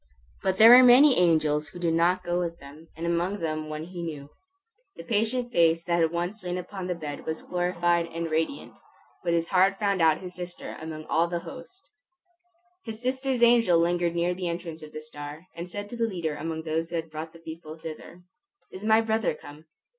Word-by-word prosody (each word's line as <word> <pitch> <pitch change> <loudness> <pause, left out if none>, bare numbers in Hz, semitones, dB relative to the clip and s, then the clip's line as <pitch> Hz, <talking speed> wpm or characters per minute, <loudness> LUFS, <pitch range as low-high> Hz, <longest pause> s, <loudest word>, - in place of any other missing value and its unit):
But 190 -1 0
there 225 +3 +9
were 255 - +9
many 255 +3 +7
angels 155 -3 +2
who 175 - -12
did 170 -2 0
not 175 +2 +2
go 175 0 -1
with 170 -1 -3
them, 145 +4 -14
and 165 - -4
among 170 +4 0
them 155 -3 -3
one 155 0 -5
he 175 +1 -8
knew. 150 -4 -6 0.6
The - - -9
patient 235 +2 -1
face 165 -4 +3
that 170 -2 +1
once 175 +5 -3
had 180 - -8
lain 175 - -2
upon 185 0 -6
the 180 - -2
bed 150 -3 -6
was 160 0 -4
glorified 175 -1 0
and 165 0 -5
radiant, 160 - -2 0.5
but 170 -1 0
his 165 0 0
heart 190 +1 +3
found 200 -3 0
out 160 -1 +5
his 180 -1 -8
sister 180 0 -7
among 155 -1 -7
all 165 +2 +2
the 170 0 -3
host. 285 - -12 1.0
His 220 -2 -7
sister's 260 0 -1
angel 235 -7 +5
lingered 170 0 +1
near 170 +1 +1
the 180 -1 -3
entrance 170 -1 -6
of 155 -1 -10
the 155 - -7
star, 150 +1 -9
and 170 +1 -6
said 205 +2 -6
to - - -5
the 230 -1 0
leader 170 -7 -3
among 160 +2 -5
those 165 +1 -2
who 170 - -5
had 165 -1 -4
brought 155 +1 -6
the 165 - -14
people 160 -1 -9
thither, 165 +2 -10 0.5
"Is 185 - -9
my 220 +1 +4
brother 220 -6 0
come?" 150 +2 -13
170 Hz, 205 wpm, -27 LUFS, 160-190 Hz, 1.0 s, there